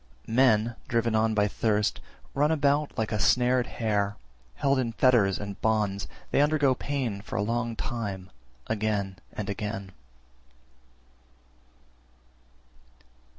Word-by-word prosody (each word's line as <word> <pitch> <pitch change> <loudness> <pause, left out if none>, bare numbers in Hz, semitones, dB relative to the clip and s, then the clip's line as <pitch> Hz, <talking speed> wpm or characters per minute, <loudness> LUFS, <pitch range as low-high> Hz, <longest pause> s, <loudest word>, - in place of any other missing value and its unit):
342. 115 - -5 0.3
Men, 120 - -6
driven 115 -1 +1
on 110 0 +2
by 105 -1 +3
thirst, 105 0 0 0.3
run 145 +2 +2
about 145 -1 +2
like 110 -1 -1
a 105 - -1
snared 125 +3 +3
hare; 105 -4 -1 0.4
held 140 -1 +2
in 115 -3 -1
fetters 115 -7 +4
and 100 -1 -7
bonds, 105 -3 0 0.2
they - - +4
undergo 145 -2 +3
pain 125 -7 -3
for 105 - -8
a 100 - +1
long 115 +1 -1
time, 100 -7 -4 0.4
again 105 -3 -1
and 105 - -5
again. 100 -1 -4
110 Hz, 120 wpm, -27 LUFS, 105-125 Hz, 0.4 s, fetters